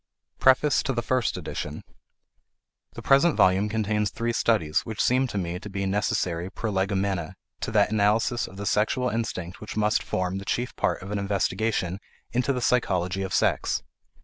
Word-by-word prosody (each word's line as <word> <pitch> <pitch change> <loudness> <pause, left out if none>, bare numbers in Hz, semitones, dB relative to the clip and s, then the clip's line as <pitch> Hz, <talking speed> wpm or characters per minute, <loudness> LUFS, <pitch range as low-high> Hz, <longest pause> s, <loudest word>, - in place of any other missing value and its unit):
PREFACE 130 +2 +4
TO 135 - -1
THE 120 -1 -2
FIRST 130 -1 0
EDITION. - - -5 1.1
The - - -9
present 140 +5 +4
volume 95 +3 +4
contains 105 -1 0
three 115 0 -2
studies 85 -11 +2
which 110 -3 -7
seem 130 +2 +3
to 105 - -5
me 90 -1 -2
to 105 - -9
be 100 0 -3
necessary 90 -3 -1
prolegomena 95 -4 -1 0.2
to - - -3
that 105 -1 +3
analysis 110 +3 +2
of 95 - -12
the 100 - -5
sexual 125 +5 +1
instinct 100 -7 -4
which 105 - -7
must 105 0 +2
form 90 +1 -2
the - - -7
chief 120 +4 -2
part - - -1
of 95 - -7
an 105 - -1
investigation 100 -1 -1 0.3
into 125 +3 +1
the 125 -2 -2
psychology 95 -7 +1
of 95 - -3
sex. - - +1
105 Hz, 170 wpm, -26 LUFS, 95-115 Hz, 1.1 s, PREFACE